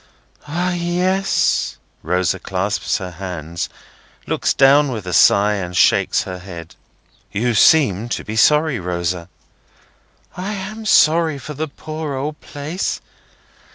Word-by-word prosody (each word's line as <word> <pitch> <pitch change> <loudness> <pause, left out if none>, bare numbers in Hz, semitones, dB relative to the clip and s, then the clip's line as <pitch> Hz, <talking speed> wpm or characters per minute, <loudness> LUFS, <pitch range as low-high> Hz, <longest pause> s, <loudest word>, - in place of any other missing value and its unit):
"Ah, 175 +4 -1
yes!" 180 +2 0 0.2
Rosa 90 +1 0
clasps 95 +3 -1
her 95 -3 -6
hands, 85 -2 -5 0.6
looks - - 0
down 140 +1 +5
with 110 -6 -5
a 90 - -4
sigh, 105 +4 +5
and 90 -3 -4
shakes - - +3
her 90 -1 -7
head. 85 -3 -10 0.6
"You 120 +4 0
seem 115 - +4
to - - -3
be 110 - -6
sorry, 150 +2 +3
Rosa." 85 0 -3 1.1
"I 190 +4 -4
am 215 +3 -6
sorry 160 -4 +4
for 150 +2 -8
the 155 +2 -3
poor 155 0 -6
old 150 +3 -4
place. 150 +6 -4
130 Hz, 125 wpm, -19 LUFS, -, 1.1 s, down